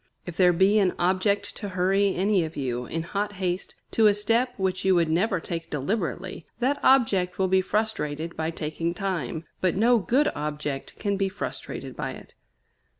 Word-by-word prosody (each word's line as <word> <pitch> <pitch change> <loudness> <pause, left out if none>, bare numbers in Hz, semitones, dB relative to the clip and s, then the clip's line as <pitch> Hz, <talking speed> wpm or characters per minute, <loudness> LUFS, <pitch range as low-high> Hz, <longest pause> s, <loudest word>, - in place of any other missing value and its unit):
If 175 - -7
there 180 0 +5
be 190 +5 +4
an 190 -3 +2
object 195 +3 +1
to 205 - -5
hurry 195 +2 +2
any 195 0 +2
of 160 -1 -6
you, 125 -3 -2
in 165 0 -3
hot 205 +4 -2
haste, 185 -1 -3 0.2
to 220 -1 +5
a 205 - +4
step 230 +5 +1
which 190 -1 -1
you 190 -1 +4
would 170 -2 +2
never 185 +4 +1
take 165 0 -5
deliberately, 170 +3 -3
that 260 +4 +1
object 200 -9 +3
will 190 - +2
be 190 0 +3
frustrated 170 -6 -2
by 160 0 -1
taking 165 +1 -3
time; 165 -5 -3 0.2
but 185 -2 +2
no 235 +4 +4
good 260 +9 +2
object 150 -2 -4
can 200 -1 -1
be 195 0 +1
frustrated - - -6
by - - -3
it. - - -13
185 Hz, 180 wpm, -26 LUFS, 165-205 Hz, 0.2 s, there